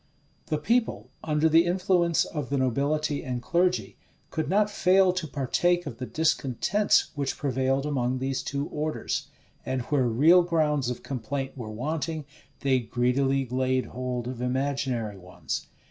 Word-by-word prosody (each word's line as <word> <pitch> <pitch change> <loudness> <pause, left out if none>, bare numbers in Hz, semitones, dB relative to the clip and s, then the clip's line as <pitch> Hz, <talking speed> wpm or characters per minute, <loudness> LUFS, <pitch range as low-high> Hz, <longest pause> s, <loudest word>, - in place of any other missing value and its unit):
The 155 - 0
people, 230 +9 0
under 155 0 +2
the 165 +1 +6
influence 175 -1 +2
of 150 -5 -5
the 140 - 0
nobility 140 +4 0
and 125 -2 -3
clergy, 175 +7 0 0.3
could 155 -2 -2
not 205 +3 +3
fail 190 -2 +4
to 185 -3 -3
partake 175 +6 +1
of 115 - -7
the 125 - -4
discontents 160 - +1
which 140 -2 -2
prevailed 135 0 0
among 130 -3 0
these 130 0 -2
two 140 0 -3
orders; 155 +1 -2 0.4
and 130 -1 -2
where 130 -1 +1
real 155 +10 +6
grounds 150 -6 +1
of 125 - -5
complaint 135 +1 -4
were 120 -5 -6
wanting, 155 +6 -3 0.4
they 135 -2 +3
greedily 130 +3 +1
laid 130 +1 0
hold 125 -1 -4
of 125 -1 -5
imaginary 125 -5 -1
ones. 90 0 -5
140 Hz, 145 wpm, -27 LUFS, 130-160 Hz, 0.4 s, the